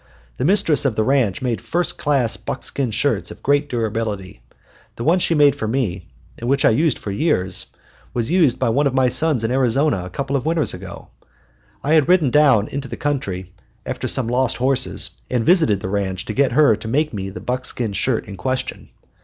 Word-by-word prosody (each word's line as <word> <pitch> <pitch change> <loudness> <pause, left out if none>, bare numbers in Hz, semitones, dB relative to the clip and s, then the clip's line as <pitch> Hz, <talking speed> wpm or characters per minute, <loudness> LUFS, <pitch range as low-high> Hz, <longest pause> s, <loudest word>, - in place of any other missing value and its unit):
The - - -1
mistress 185 -4 +3
of 135 -6 0
the 110 - +1
ranch 130 -5 +1
made 120 -3 -1
first 165 +10 -2
class 135 -6 +1
buckskin 135 -3 -3
shirts 140 +6 -1
of - - -12
great 145 +1 +1
durability. 110 - -3 0.5
The 115 - -5
one 170 +6 +3
she 170 - +1
made 145 -3 +5
for 110 - -4
me, 105 -7 -2 0.3
and 120 - -3
which 140 - +2
I - - +6
used 150 +4 +2
for 100 - -6
years, 100 - 0 0.4
was 120 +4 -2
used 160 -9 +3
by - - 0
one 140 +5 +2
of 135 - -2
my 130 -1 +3
sons 150 -3 +1
in 115 - 0
Arizona 130 -3 +1
a 90 - -7
couple 140 +8 -3
of 135 - 0
winters 160 0 0
ago. 90 -1 -10 0.7
I 150 - +1
had 155 0 +4
ridden 170 -8 +4
down 135 -7 +4
into 140 0 -5
the - - -7
country 95 -11 -3 0.3
after - - -4
some 130 - +2
lost 125 0 0
horses, 130 0 +2 0.2
and 120 -3 0
visited 160 - +3
the - - -4
ranch 95 -2 -2
to 110 - -4
get 140 +3 +1
her 145 -8 +5
to 110 - -9
make 150 +5 0
me 95 -2 -4
the 95 - -8
buckskin 125 -3 -2
shirt 115 +3 -1
in 100 - -8
question. 130 +8 -3
130 Hz, 205 wpm, -20 LUFS, 110-145 Hz, 0.7 s, I